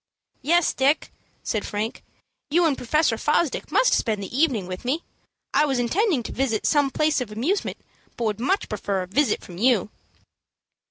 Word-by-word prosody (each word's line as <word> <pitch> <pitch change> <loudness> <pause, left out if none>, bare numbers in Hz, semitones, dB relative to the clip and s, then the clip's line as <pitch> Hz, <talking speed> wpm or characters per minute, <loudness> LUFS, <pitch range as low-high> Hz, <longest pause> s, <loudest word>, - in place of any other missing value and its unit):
"Yes, 345 +3 +3
Dick," 275 +4 +1 0.3
said 215 - -1
Frank, 215 +2 -4 0.5
"you 340 +4 +3
and 305 -4 +2
Professor 260 -1 +1
Fosdick 300 0 0
must - - +4
spend 215 -4 0
the 195 - -7
evening 265 - +2
with 185 0 -7
me. 280 +7 -1 0.5
I 300 - +4
was 270 -2 0
intending 300 - +1
to - - -6
visit 245 -5 -1
some 290 -2 +3
place 305 0 +1
of 230 -4 -5
amusement, 285 - -1 0.4
but 240 - -3
would 215 0 -1
much 375 - 0
prefer 200 -2 -2
a - - -9
visit 275 +10 +1
from 175 -1 -10
you." 220 -4 +2
260 Hz, 170 wpm, -24 LUFS, 215-305 Hz, 0.5 s, must